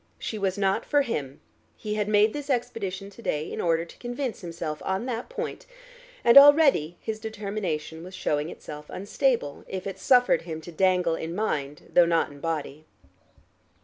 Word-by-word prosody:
She 215 Hz, -, -5 dB
was 195 Hz, 0 st, -1 dB
not 195 Hz, -1 st, +1 dB
for 290 Hz, -1 st, +2 dB
him: 140 Hz, -, -4 dB, 0.4 s
he 210 Hz, -1 st, -4 dB
had 210 Hz, -1 st, -1 dB
made 210 Hz, +1 st, +4 dB
this 290 Hz, -1 st, -6 dB
expedition 205 Hz, -6 st, -2 dB
to 220 Hz, -, -14 dB
day 150 Hz, -7 st, -2 dB
in -, -, -3 dB
order 165 Hz, -1 st, +1 dB
to -, -, -15 dB
convince 245 Hz, 0 st, -4 dB
himself 165 Hz, -3 st, -5 dB
on 190 Hz, +4 st, -1 dB
that 245 Hz, -, -4 dB
point, -, -, -5 dB, 0.6 s
and 235 Hz, +4 st, +10 dB
already 280 Hz, -, +6 dB
his 220 Hz, -1 st, -4 dB
determination 200 Hz, -7 st, -4 dB
was 185 Hz, +1 st, -9 dB
showing 150 Hz, +1 st, -1 dB
itself 150 Hz, -3 st, -9 dB
unstable, 200 Hz, -, -1 dB
if 190 Hz, -1 st, -5 dB
it 195 Hz, -1 st, -5 dB
suffered 250 Hz, -8 st, +4 dB
him 160 Hz, -2 st, -6 dB
to 175 Hz, -, -10 dB
dangle 180 Hz, 0 st, +2 dB
in 165 Hz, +1 st, -4 dB
mind 150 Hz, -9 st, -3 dB
though 175 Hz, -1 st, +6 dB
not 165 Hz, -3 st, +1 dB
in 145 Hz, -, -13 dB
body. 155 Hz, -1 st, -4 dB
190 Hz, 175 wpm, -26 LUFS, 160-220 Hz, 0.6 s, and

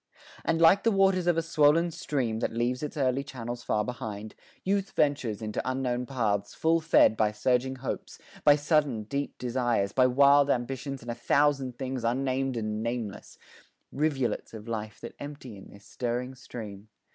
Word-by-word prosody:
And 165 Hz, 0 st, +1 dB
like 170 Hz, +4 st, +6 dB
the 230 Hz, -, +3 dB
waters 195 Hz, -3 st, +3 dB
of 175 Hz, -2 st, +3 dB
a 165 Hz, -, +1 dB
swollen 165 Hz, +1 st, +3 dB
stream, 130 Hz, -8 st, -2 dB
That -, -, -1 dB
leaves 120 Hz, +2 st, -1 dB
its 150 Hz, 0 st, -5 dB
early 135 Hz, -1 st, +1 dB
channels 120 Hz, -3 st, -6 dB
far 105 Hz, -3 st, 0 dB
behind, 110 Hz, -3 st, -6 dB, 0.3 s
Youth 195 Hz, 0 st, -1 dB
ventures 125 Hz, -7 st, 0 dB
into 105 Hz, -1 st, -2 dB
unknown 125 Hz, -1 st, -2 dB
paths, 105 Hz, -6 st, -1 dB
full 165 Hz, +1 st, +2 dB
fed 155 Hz, -7 st, +5 dB
By 110 Hz, -1 st, +2 dB
surging 125 Hz, +4 st, 0 dB
hopes, 130 Hz, 0 st, -5 dB, 0.3 s
by 145 Hz, -, +7 dB
sudden, 145 Hz, -6 st, +1 dB
deep 140 Hz, +6 st, -4 dB
desires, 120 Hz, -5 st, 0 dB
By 130 Hz, -1 st, +5 dB
wild 140 Hz, +2 st, +5 dB
ambitions 135 Hz, +1 st, -2 dB
and 120 Hz, -, -4 dB
a -, -, -2 dB
thousand 135 Hz, +1 st, +1 dB
things, 130 Hz, -2 st, -4 dB
Unnamed 130 Hz, +1 st, 0 dB
and 110 Hz, -1 st, -2 dB
nameless 115 Hz, -3 st, -5 dB, 0.5 s
rivulets 140 Hz, -6 st, -1 dB
of 110 Hz, +1 st, -10 dB
life 110 Hz, -2 st, -5 dB
That 120 Hz, -, -7 dB
ever -, -, -6 dB
empty 135 Hz, -6 st, -10 dB
in 95 Hz, -, -13 dB
this 100 Hz, 0 st, -16 dB
stirring 125 Hz, +1 st, -3 dB
stream. 110 Hz, -5 st, -9 dB
130 Hz, 170 wpm, -28 LUFS, 115-145 Hz, 0.5 s, by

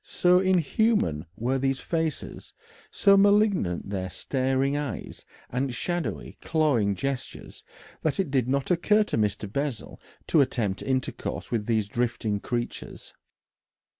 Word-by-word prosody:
So 180 Hz, 0 st, +3 dB
inhuman 185 Hz, -, +1 dB
were 125 Hz, +6 st, -1 dB
these 135 Hz, 0 st, 0 dB
faces, 160 Hz, -3 st, -3 dB, 0.4 s
so 200 Hz, -1 st, +4 dB
malignant 200 Hz, -, +3 dB
their 95 Hz, -2 st, -3 dB
staring 135 Hz, +5 st, 0 dB
eyes, 145 Hz, -5 st, -5 dB, 0.3 s
and 130 Hz, +2 st, -1 dB
shadowy, 175 Hz, +6 st, -3 dB
clawing 135 Hz, -11 st, +2 dB
gestures, 135 Hz, +6 st, -5 dB, 0.4 s
that 155 Hz, 0 st, -1 dB
it 185 Hz, -8 st, 0 dB
did 130 Hz, -3 st, +1 dB
not 140 Hz, +4 st, 0 dB
occur 210 Hz, +5 st, +4 dB
to 210 Hz, -, -3 dB
Mr. 105 Hz, 0 st, 0 dB
Bessel 140 Hz, -5 st, -3 dB, 0.2 s
to 155 Hz, -, +4 dB
attempt 110 Hz, -7 st, -1 dB
intercourse 130 Hz, -1 st, -3 dB
with 110 Hz, -3 st, -1 dB
these 110 Hz, -3 st, +1 dB
drifting 115 Hz, -2 st, -1 dB
creatures. 120 Hz, +2 st, -5 dB
135 Hz, 125 wpm, -26 LUFS, 115-165 Hz, 0.4 s, so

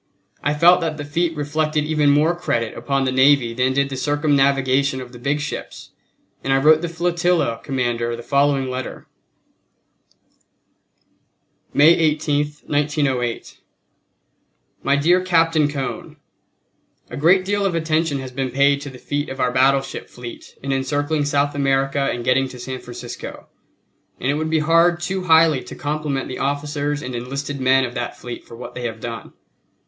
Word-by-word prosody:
I 145 Hz, -, +1 dB
felt 175 Hz, +4 st, +6 dB
that 160 Hz, -2 st, -2 dB
the 145 Hz, -, -5 dB
feat 165 Hz, +2 st, -1 dB
reflected 150 Hz, +1 st, 0 dB
even 150 Hz, -2 st, +2 dB
more 150 Hz, +4 st, +3 dB
credit 115 Hz, -9 st, -2 dB
upon 135 Hz, -1 st, -1 dB
the 130 Hz, -, 0 dB
navy 130 Hz, -2 st, +4 dB
than 125 Hz, +2 st, +1 dB
did 140 Hz, +1 st, +1 dB
the 135 Hz, -, -5 dB
circumnavigation 140 Hz, -2 st, +1 dB
of 125 Hz, -1 st, -9 dB
the 120 Hz, -, -12 dB
big 140 Hz, +4 st, -1 dB
ships, 150 Hz, -1 st, -6 dB, 0.5 s
and 135 Hz, -, -1 dB
I 135 Hz, -, +4 dB
wrote 155 Hz, +3 st, +5 dB
the 175 Hz, -, -3 dB
flotilla 170 Hz, -7 st, 0 dB
commander 120 Hz, -3 st, -1 dB
the 120 Hz, -, -9 dB
following 140 Hz, -1 st, +2 dB
letter: 130 Hz, 0 st, -5 dB, 2.7 s
May 150 Hz, +3 st, +6 dB
18, 150 Hz, -3 st, +1 dB, 0.2 s
1908. 145 Hz, -5 st, -1 dB, 1.2 s
My 140 Hz, -, +2 dB
dear 170 Hz, +6 st, +3 dB
Captain 165 Hz, -4 st, +3 dB
Cone: 140 Hz, -3 st, -5 dB, 0.9 s
A -, -, -5 dB
great 180 Hz, +6 st, +4 dB
deal 205 Hz, +1 st, 0 dB
of 195 Hz, -3 st, 0 dB
attention 160 Hz, -2 st, 0 dB
has 130 Hz, -1 st, -6 dB
been 130 Hz, 0 st, -2 dB
paid 140 Hz, +2 st, +2 dB
to 145 Hz, -, -6 dB
the 130 Hz, -, -11 dB
feat 145 Hz, +3 st, -3 dB
of 130 Hz, -, -7 dB
our 125 Hz, -, +1 dB
battleship 135 Hz, +2 st, +1 dB
fleet 120 Hz, -1 st, -10 dB
in 135 Hz, -, -2 dB
encircling 145 Hz, +3 st, -1 dB
South 145 Hz, 0 st, +1 dB
America 135 Hz, 0 st, +1 dB
and 120 Hz, -1 st, -5 dB
getting 135 Hz, +1 st, +2 dB
to 130 Hz, -, -10 dB
San 130 Hz, +1 st, -6 dB
Francisco; 120 Hz, -1 st, -8 dB, 0.7 s
and 130 Hz, -, 0 dB
it -, -, 0 dB
would 155 Hz, +2 st, -2 dB
be 160 Hz, -, +2 dB
hard 165 Hz, +2 st, +3 dB
too 185 Hz, +1 st, -3 dB
highly 160 Hz, -4 st, +4 dB
to -, -, -10 dB
compliment 145 Hz, -2 st, -3 dB
the 130 Hz, -, -6 dB
officers 145 Hz, +1 st, -2 dB
and 130 Hz, -, -5 dB
enlisted 140 Hz, +3 st, -4 dB
men 130 Hz, +1 st, +4 dB
of 125 Hz, -, -6 dB
that 120 Hz, -2 st, -4 dB
fleet 120 Hz, -1 st, -8 dB
for -, -, -12 dB
what 120 Hz, -, -8 dB
they 125 Hz, -, -6 dB
have 110 Hz, -1 st, -4 dB
done. 115 Hz, 0 st, -7 dB
140 Hz, 165 wpm, -21 LUFS, 130-155 Hz, 2.7 s, felt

